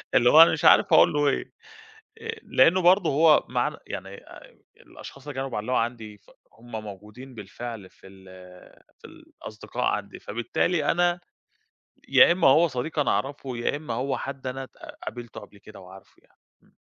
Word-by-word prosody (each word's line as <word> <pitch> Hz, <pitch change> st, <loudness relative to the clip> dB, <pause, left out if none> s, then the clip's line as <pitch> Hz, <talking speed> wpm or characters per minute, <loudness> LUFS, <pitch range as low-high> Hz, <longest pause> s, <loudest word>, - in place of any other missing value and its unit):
اللي 120 Hz, -1 st, +5 dB
هو 160 Hz, -, +8 dB
أنا 165 Hz, -, +2 dB
مش 160 Hz, +1 st, -3 dB
عارف -, -, +5 dB
أقول -, -, +5 dB
له 145 Hz, -1 st, +1 dB
إيه -, -, -4 dB, 0.9 s
لأن 185 Hz, +3 st, +3 dB
برضه 180 Hz, 0 st, +4 dB
هو 155 Hz, +1 st, +4 dB
معانا -, -, -2 dB
يعني 95 Hz, +1 st, -8 dB, 0.5 s
الأشخاص 140 Hz, -, -14 dB
اللي 145 Hz, -1 st, -8 dB
كانوا 135 Hz, 0 st, -4 dB
بيعلقوا 115 Hz, +4 st, -2 dB
عندي 115 Hz, -3 st, -5 dB
ف 100 Hz, -, -27 dB, 0.2 s
هُم 120 Hz, +1 st, -18 dB
موجودين 105 Hz, +6 st, -12 dB
بالفعل 105 Hz, -1 st, -9 dB
في 95 Hz, -, -19 dB
ال 95 Hz, 0 st, -17 dB, 0.7 s
في -, -, -14 dB
ال -, -, -17 dB, 0.2 s
الأصدقاء -, -, -6 dB
عندي. -, -, -3 dB
فبالتالي 145 Hz, +8 st, -1 dB
أنا 175 Hz, 0 st, +1 dB, 0.9 s
يا -, -, +6 dB
إما 175 Hz, -6 st, +2 dB
هو 165 Hz, +5 st, +4 dB
صديق 130 Hz, +4 st, -5 dB
أنا 145 Hz, -, +1 dB
أعرفه، 135 Hz, -2 st, -3 dB
يا 120 Hz, +4 st, -2 dB
إما 150 Hz, -6 st, -6 dB
هو 130 Hz, +2 st, -2 dB
حد 135 Hz, -1 st, -7 dB
أنا 135 Hz, +1 st, -6 dB
اتق -, -, -14 dB
قابلته 120 Hz, -2 st, -8 dB
قبل 100 Hz, -, -16 dB
كده 100 Hz, -, -15 dB
وعارفه 95 Hz, +1 st, -16 dB
يعني. -, -, -33 dB, 0.2 s
امم. -, -, -32 dB
130 Hz, 170 wpm, -25 LUFS, 110-150 Hz, 0.9 s, هو